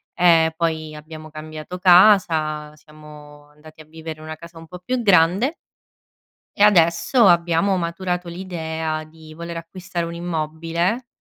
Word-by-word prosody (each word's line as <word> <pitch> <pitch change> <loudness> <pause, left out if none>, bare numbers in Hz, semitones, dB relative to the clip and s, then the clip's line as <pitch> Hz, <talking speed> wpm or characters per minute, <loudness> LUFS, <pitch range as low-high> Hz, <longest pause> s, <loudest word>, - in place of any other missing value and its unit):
ehm, 165 -2 +4
poi 160 -2 -2
abbiamo 155 +1 -11
cambiato 155 +3 -8
casa, 170 -5 +4
siamo 150 -1 -15
andati 155 +1 -16
a - - -15
vivere 160 0 -9
in 155 - -11
una 155 0 -6
casa 170 +1 -14
un 165 - -11
po' 180 +1 -10
più 255 +4 -2
grande 195 - +3 1.0
e 205 - +3
adesso, 200 +4 +4
abbiamo 170 +2 +2
maturato 180 0 -3
l'idea 160 -3 -4
di 155 0 -15
voler 170 +1 -7
acquistare 175 +1 -6
un 170 - -7
immobile, 170 +6 -3
165 Hz, 140 wpm, -21 LUFS, 155-180 Hz, 1.0 s, ehm